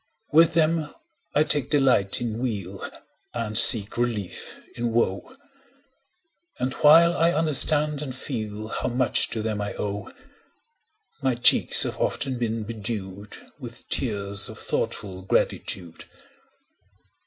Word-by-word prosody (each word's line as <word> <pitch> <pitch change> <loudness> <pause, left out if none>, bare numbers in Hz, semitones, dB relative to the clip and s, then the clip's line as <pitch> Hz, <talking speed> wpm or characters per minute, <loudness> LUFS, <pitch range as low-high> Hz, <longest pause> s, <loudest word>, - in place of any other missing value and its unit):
With 165 +1 +5
them 160 -1 +1 0.4
I 150 - +5
take 145 -4 -2
delight 130 -10 +2
in 115 -2 -3
weal 100 -6 -4 0.5
And 115 -2 -4
seek 105 -2 +4
relief 115 -6 -3 0.2
in 120 0 -2
woe; 115 - -1 1.2
And 130 +1 -2
while 165 +3 +6
I 170 +1 +2
understand 150 -1 +3
and 135 -4 -5
feel 110 -5 -5
How - - -3
much 125 0 +1
to 110 - -4
them 110 -2 -2
I 100 - -4
owe, 100 -1 -4
10 - - -14 1.1
My 130 -2 +1
cheeks 120 - +5
have - - -4
often 130 -3 -2
been 115 -2 -2
bedew'd 105 -2 -6 0.2
With - - -10
tears 100 0 0
of - - -10
thoughtful 95 -2 -3
gratitude. 90 -2 -2
120 Hz, 125 wpm, -24 LUFS, 105-145 Hz, 1.2 s, while